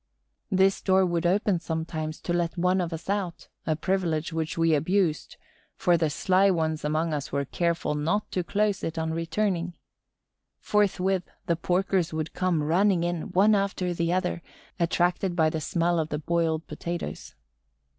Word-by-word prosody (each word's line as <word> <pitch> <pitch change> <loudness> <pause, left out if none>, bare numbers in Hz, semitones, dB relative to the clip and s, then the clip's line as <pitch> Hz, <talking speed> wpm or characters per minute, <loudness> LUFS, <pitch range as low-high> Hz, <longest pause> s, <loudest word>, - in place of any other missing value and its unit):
This 190 +1 +3
door 190 -1 +4
would 175 -1 0
open 195 0 +2
sometimes 160 -1 -4
to 175 - -2
let 175 0 -1
one 180 +2 +2
of 175 -1 -3
us 165 +1 -6
out, 195 -4 -3 0.2
a 155 - +2
privilege 165 -2 -1
which 160 0 -2
we 165 -1 +3
abused, 160 +1 0 0.4
for 175 - +3
the 160 -2 +1
sly 190 +6 +3
ones 160 -4 0
among 155 +2 0
us 145 -2 -3
were 140 0 -1
careful 170 0 -1
not 160 +8 -1
to 180 - -1
close 205 +1 0
it 165 +1 -3
on 160 0 -1
returning. 175 +1 -1 0.8
Forthwith, 195 -3 +1 0.2
the 170 - +1
porkers 180 0 0
would 155 0 -3
come 180 -5 0
running 180 +3 +3
in, 175 +2 -2
one 205 +4 +5
after 195 -3 0
the 170 0 0
other, 180 -1 -1 0.4
attracted 175 +1 +1
by 160 -2 +3
the 160 - -3
smell 170 +2 +1
of 155 -1 -1
the 150 - -2
boiled 160 0 0
potatoes. 170 - -6
170 Hz, 165 wpm, -27 LUFS, 160-185 Hz, 0.8 s, one